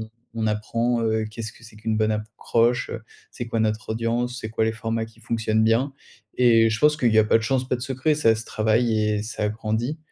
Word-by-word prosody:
on 110 0 -8 0.2
on 110 -1 -1
apprend 115 +3 0
heu 110 -1 0
qu'est-ce 110 0 -6
que - - -20
c'est 110 -2 -14
qu'une 110 0 -2
bonne 110 0 +2
accroche, 115 +3 0 0.4
c'est 120 - -6
quoi 115 -1 -1
notre 110 0 -1
audience, 120 +2 -1
c'est 110 - -5
quoi 110 0 0
les 110 - +1
formats 115 0 -2
qui 115 - -20
fonctionnent 110 -1 0
bien? 120 +5 +2 0.5
Et 115 -2 +5
je 115 - -1
pense 150 0 +4
qu'il 120 -6 +2
y 110 - +5
a 110 - +6
pas 110 - +4
de 110 - -5
chance, 130 +2 0
pas - - +1
de 120 - -9
secret, 135 +4 0
ça 115 -7 +3
se 110 +1 -6
travaille 110 +1 +1
et 105 -1 0
ça 105 -1 -2
grandit. 110 +7 -2
115 Hz, 230 wpm, -24 LUFS, 110-120 Hz, 0.5 s, a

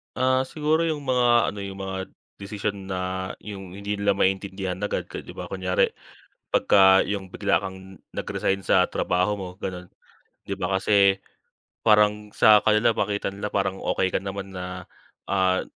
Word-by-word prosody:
Ah 130 0 +2
siguro 155 +3 +1
'yung 150 -3 -2
mga 120 -2 +3
ano, 100 - -8
'yung 100 -1 -6
mga 95 -1 -5 0.3
desisyon 100 -1 -4
na 95 - -3 0.5
'yung 95 -3 -8
hindi 100 +1 -4
nila 100 -1 +2
maintindihan 95 -1 -1
agad 105 - -3
ka - - -5
'di - - -11
ba - - -6
kunyari 95 -1 +1 0.6
pagka 95 -1 +6
'yung 95 -2 -4
bigla 85 +3 +1
kang 95 0 -8 0.2
nag-resign 95 0 -1
sa 95 -1 +3
trabaho 95 +3 0
mo 95 - -5 0.2
gano'n. 90 -1 -5 0.6
'Di 100 0 -5
ba 95 +1 -1
kasi 100 0 +3 0.6
parang 105 -1 +3
sa 105 -1 +7
kanila 110 +2 +3
makita 100 -2 -1
nila 100 +1 -4
parang 95 -2 -1
okey 95 - 0
ka - - +1
naman 95 0 -6
na, 90 0 -6 0.5
ah, 95 -1 +2
100 Hz, 155 wpm, -25 LUFS, 95-105 Hz, 0.6 s, sa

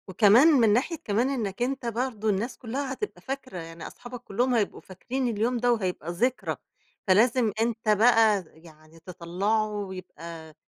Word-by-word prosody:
وكمان 210 - +6
من 240 -10 +5
ناحية 265 +9 +1
كمان 225 +5 +1
إنّك 225 -7 -3
أنت 265 +1 -1
برضو 230 -2 -2
الناس 210 +5 -1
كُلّها 260 +3 -4
هتبقى 420 +10 -6
فاكرة، 265 -6 -6
يعني 165 -1 -8
أصحابك 245 0 -10
كُلُّهم 245 +5 0
هيبقوا 215 -3 -1
فاكرين 250 +8 -4
اليوم 235 +2 0
ده 245 +1 +2
وهيبقى 180 -6 -3
ذكرى، 245 +9 -1 0.5
فلازم 225 +4 +4
أنت 225 -1 -1
بقى 215 -2 +5
يعني 160 0 -18
تطَلّعه 185 +5 -1
ويبقى 180 -5 -8
220 Hz, 145 wpm, -26 LUFS, 185-245 Hz, 0.5 s, وكمان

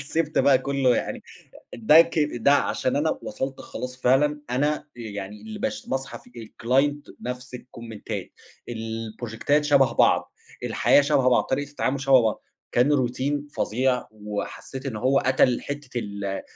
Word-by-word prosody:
كُ - - -5
سِبت 155 +2 -1
بقى 135 -2 +5
كُلُّه 135 -2 +1
يعني، - - -3 0.5
ده 135 +8 +6
ك 165 -1 +1 0.2
ده 140 - +5
عشان 135 -2 +1
أنا 155 +2 0
وصلت 135 0 -4
خلاص 125 0 -7
فعلًا، 145 +4 +2
أنا 145 +5 0
يعني 105 -3 -7
اللي 220 -1 -8
بش 265 +2 -3
باصحى 135 +1 -4
في - - -20 0.2
الClient 135 +6 0
نفس 125 +1 -6
الكومنتات 115 -3 -7 0.4
البروجيكتات 115 +5 -2
شبه 140 -3 +4
بعض، - - +3 0.3
الحياة - - +4
شبه 140 -3 +3
بعض، 125 - +3
طريقة 145 +2 -2
التعامُل 140 -1 -1
شبه 135 -2 +5
بعض، 110 -1 -1 0.3
كان 140 +5 +3
Routine 145 +3 -3
فظيع، 125 +3 0
وحسّيت 105 +5 -6
إن 115 -5 -4
هو 130 +5 +2
قتل 130 -1 +3
حتّة 140 -3 -5
ال 100 -2 -4
130 Hz, 150 wpm, -25 LUFS, 120-145 Hz, 0.5 s, ده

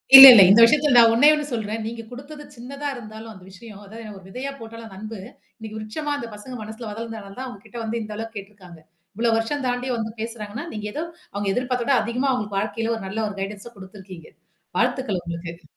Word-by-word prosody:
இல்ல, 270 - +15
இல்ல. 205 - +9
இந்த 205 - +7
விஷயத்தில 295 +3 +3
நான் 230 -1 +8
ஒன்னேயொன்னு 295 +4 +4
சொல்றேன். 220 -1 -3
நீங்க 230 +1 -5
குடுத்தது 285 +4 -10
சின்னதா 275 +4 -7
இருந்தாலும் 220 -1 -10
அந்த 190 -3 -14
விஷயம் 205 +1 -13
அது 205 +3 -13 0.2
ஒரு 190 - -13
விதையா 255 +8 -6
போட்டாலும் 230 0 -10
அந்த 220 - -12
அன்பு, 215 +2 -7 0.4
இன்னக்கி 220 -2 -9
விருட்சமா 220 +8 -5
அந்த 235 - -6
பசங்க 210 +5 -10
மனசுல 220 +1 -8
வளந்தனாலதான் 220 -2 -8
தான் 260 - -5
உங்ககிட்ட 215 0 -12
வந்து 225 +1 -3
இந்த 215 0 -7
அளவுக்கு 225 0 -7
கேட்டுருக்காங்க. 195 -4 -12 0.4
இவ்ளோ 235 0 +1
வருஷம் 265 +6 -2
தாண்டி 245 +1 -2
வந்து 220 -1 -4
பேசுறாங்கன்னா, 225 +3 -6
நீங்க 210 -1 -6
ஏதோ 310 - -3 0.3
அவுங்க 200 0 -2
எதிர்பார்த்த 250 -1 -1
விட 275 - +2
அதிகமா 245 +5 -1
அவுங்களுக்கு 210 -5 -2
வாழ்க்கையில 225 +3 -2
ஒரு 225 - -7
நல்ல 210 +4 -4
ஒரு 210 - -6
கைடன்ஸ 200 +3 -6
குடுத்துருக்கீங்க. 190 -3 -12 0.5
வாழ்த்துக்கள் 215 -9 0
உங்களுக்கு. 170 0 -6
ம் 175 - -29
225 Hz, 200 wpm, -23 LUFS, 205-245 Hz, 0.5 s, இல்ல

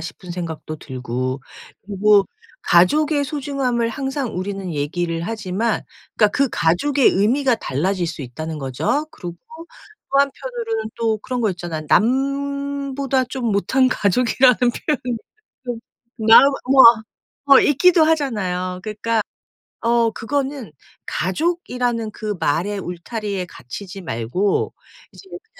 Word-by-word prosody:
싶은 175 +2 -9
생각도 165 -3 -5
들고. 130 -1 -4 0.4
그리고 205 0 +4 0.4
가족의 290 - +3
소중함을 265 -5 -1
항상 270 0 -3
우리는 195 -2 -4
얘기를 165 +3 -2
하지만 215 +2 -2 0.3
그니까 210 - +5
그 275 -2 +2
가족의 255 - +2
의미가 245 +6 +2
달라질 180 +2 -1
수 160 -3 -5
있다는 155 +6 -6
거죠. 150 - -1
그리고 175 -2 -8 0.7
또 275 - +3
한편으로는 240 -5 -2
또 225 -2 +1
그런 250 +4 -4
거 215 - +2
있잖아 170 -3 -5
남보다 275 +2 0
좀 245 -3 -2
못한 255 +6 +2
가족이라는 250 +3 +3
표현이 250 0 0 0.5
좀 240 -2 -3 0.5
남 225 - +9 0.3
뭐 270 -1 +8
아 230 -1 +8 0.5
어 275 - +9
있기도 330 +4 +4
하잖아요. 190 - -1
그러니까 220 +2 -1 0.6
어 235 0 +3
그거는 270 - -3 0.3
가족이라는 245 - -1
그 210 -1 -4
말의 195 +8 0
울타리에 195 +2 -4
갇히지 190 +11 -9
말고 160 - -1 0.4
이제 390 - -15
그러니까 360 +4 -10
225 Hz, 280 characters per minute, -20 LUFS, 180-265 Hz, 0.7 s, 남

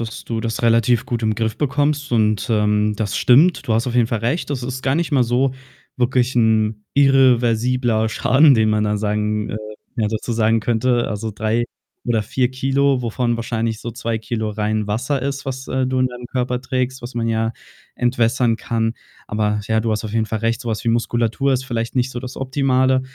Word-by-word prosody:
dass 115 -1 -6
du 115 -1 -3
das 115 +1 -3
relativ 115 0 +3
gut 120 -1 -3
im 110 -1 +1
Griff 110 0 -2
bekommst 145 0 0
und, 110 -2 +2
ähm, 105 -1 +2
das 105 -3 -2
stimmt, 145 +4 +4
du 110 - +2
hast 115 +3 +1
auf 120 - -3
jeden 120 -2 +4
Fall 115 -2 -2
recht, 130 +10 -1
das 135 -4 -3
ist 130 +1 -5
gar 130 +1 +1
nicht 165 -1 -1
mal 130 - +4
so 125 +2 +1 0.5
wirklich 125 0 +1
'n 110 -2 +2
irreversibler 125 -4 +3
Schaden, 135 +6 +4
den 110 -1 +3
man 105 0 +1
da 105 0 0
sagen 105 0 -1
äh, 105 - -4 0.4
ja 110 -2 +1
dazu 110 +2 -3
sagen 115 0 +2
könnte. 120 +1 +1
Also, 105 +1 -3
3 110 +3 -1 0.4
oder 115 -3 +1
4 125 +3 0
Kilo, 135 +1 +1
wovon 120 0 -1
wahrscheinlich 115 -1 -2
so 120 - -5
2 115 -1 -3
Kilo 110 0 -3
rein 105 0 -1
Wasser 130 +6 -1
ist, 140 0 -3
was, 130 0 -5
äh, 130 0 0
du 130 0 -1
in 130 - +3
deinem 125 -1 -8
Körper 125 -1 -1
trägst, 130 0 -2
was 120 +1 -8
man 115 -1 -1
ja 110 0 0 0.4
entwässern 120 -1 +1
kann. 115 -1 -1 0.3
Aber, 105 0 0
ja, 110 0 +2
du 115 0 -1
hast 110 0 -1
auf 105 - -5
jeden 110 -1 +1
Fall 110 -1 -3
recht, 115 +1 0
so 120 - -6
was 110 0 -3
wie - - +1
Muskulatur 120 +3 +1
ist 130 - -2
vielleicht 115 -1 -3
nicht 125 +1 +1
so 120 - -5
das 130 -1 -8
Optimale. 130 -1 +1
120 Hz, 205 wpm, -20 LUFS, 110-130 Hz, 0.5 s, stimmt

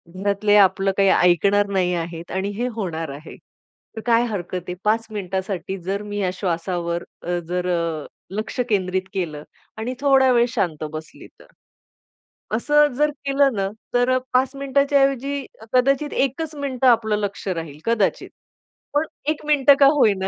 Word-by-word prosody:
घरातले 200 +2 +1
आपलं 195 0 +4
काही 195 -1 +4
ऐकणार 200 +3 +4
नाही 180 -2 +1
आहेत 170 0 -5
आणि 190 +2 -2
हे 245 +2 0
होणार 165 -7 -3
आहे. 145 +3 -9 0.6
तर 220 - -5
काय 235 0 +4
हरकत 185 -5 -4
आहे? 180 - -3
5 225 +2 +1
मिनिटासाठी 190 -1 -3
जर 195 +3 -2
मी 205 0 -6
ह्या 190 -2 +1
श्वासावर 170 -1 -2 0.2
अ, 175 0 -1
जर 180 0 -1
अ, 170 -3 -1 0.3
लक्ष 215 +2 -4
केंद्रित 190 -3 0
केलं 155 -6 -3 0.3
आणि 230 +4 -3
थोडा 270 -2 +5
वेळ 240 0 +4
शांत 175 -10 -1
बसली 155 0 -9
तर?" - - -16 1.1
असं 295 +5 +4
जर 300 +1 +3 0.2
केलं 275 -1 +3
ना 195 -1 -1 0.2
तर 245 +1 +3
अ, - - +4 0.2
5 260 +2 +2
मिनिटाच्या 280 +1 +2
ऐवजी 275 +1 -1 0.3
कदाचित 275 +3 +2
1च 300 +4 -1
मिनिटं 265 -3 -1
आपलं 220 -3 +3
लक्ष 205 -1 -4
राहील, 165 -5 -4
कदाचित. 230 -4 0 0.6
पण 295 +2 +2 0.2
1 310 -1 -2
मिनिटं 285 -2 +5
का 280 - +7
होईना, 200 -9 +2
205 Hz, 155 wpm, -22 LUFS, 180-260 Hz, 1.1 s, का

